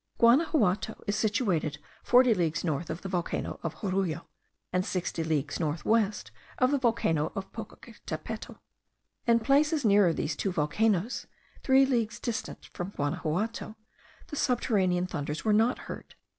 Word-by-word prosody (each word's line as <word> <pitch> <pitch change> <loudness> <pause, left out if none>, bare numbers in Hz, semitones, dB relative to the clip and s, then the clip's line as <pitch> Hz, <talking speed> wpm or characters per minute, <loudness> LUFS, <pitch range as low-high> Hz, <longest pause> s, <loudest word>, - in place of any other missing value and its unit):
Guanaxuato 235 - +3
is 205 - 0
situated 200 - 0 0.2
forty 250 -1 +5
leagues 170 -5 0
north 160 -1 -2
of 160 +2 -5
the - - -4
volcano 180 -2 -2
of 165 -2 -4
Jorullo, 185 -5 -1 0.5
and 180 0 +2
sixty 175 -3 -2
leagues 150 -3 -1
north 155 -1 -2
west 215 -2 +1 0.3
of 255 +1 +3
the 285 - +2
volcano 195 -11 +1
of 195 -2 -6
Popocatepetl. - - -7 0.7
In 235 0 +5
places 290 +3 +3
nearer 200 -4 +5
these 160 - -2
two 195 - -1
volcanoes, 185 +7 0 0.3
three 265 0 +5
leagues 235 -4 0
distant 235 -2 -4
from 180 +3 -5
Guanaxuato, 180 +10 -2 0.5
the 295 - -5
subterranean 200 -10 +1
thunders 150 -2 -4
were 215 - +4
not 225 +4 +3
heard. - - -9
200 Hz, 140 wpm, -29 LUFS, 170-230 Hz, 0.7 s, forty